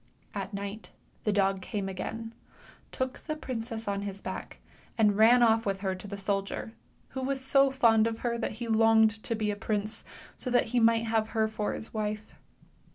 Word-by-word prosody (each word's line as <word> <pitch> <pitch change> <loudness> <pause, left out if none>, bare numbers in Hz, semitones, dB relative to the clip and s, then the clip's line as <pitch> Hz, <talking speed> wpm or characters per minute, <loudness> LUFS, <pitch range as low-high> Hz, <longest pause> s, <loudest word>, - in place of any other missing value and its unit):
A: 195 -2 -3
night 200 +2 -6 0.4
the 210 - +3
dog 195 -1 +2
came 195 +1 -3
again, 225 +4 -5 0.6
took 260 0 -3
the 310 - -4
princess 230 -6 -5
on 200 0 -1
his 200 -1 -5
back, - - -6 0.4
and 210 -3 +4
ran 235 +3 +6
off 225 -1 +4
with 195 -2 -2
her 190 -2 0
to 185 +2 -8
the 200 0 -6
soldier, 195 +2 -2 0.4
who 265 - -5
was 270 +1 0
so 275 +1 +4
fond 230 -4 +4
of 225 0 -4
her 235 -1 +1
that 225 - -2
he 235 +2 -6
longed 225 0 +5
to 230 - -1
be 215 -1 0
a - - -3
prince, 215 +1 -2 0.3
so 255 - -5
that 245 0 +3
he 245 - +4
might 230 0 +4
have 220 -1 +1
her 220 0 +4
for 215 -1 -2
his 220 - -3
wife. 215 0 -3
220 Hz, 195 wpm, -29 LUFS, 205-230 Hz, 0.6 s, ran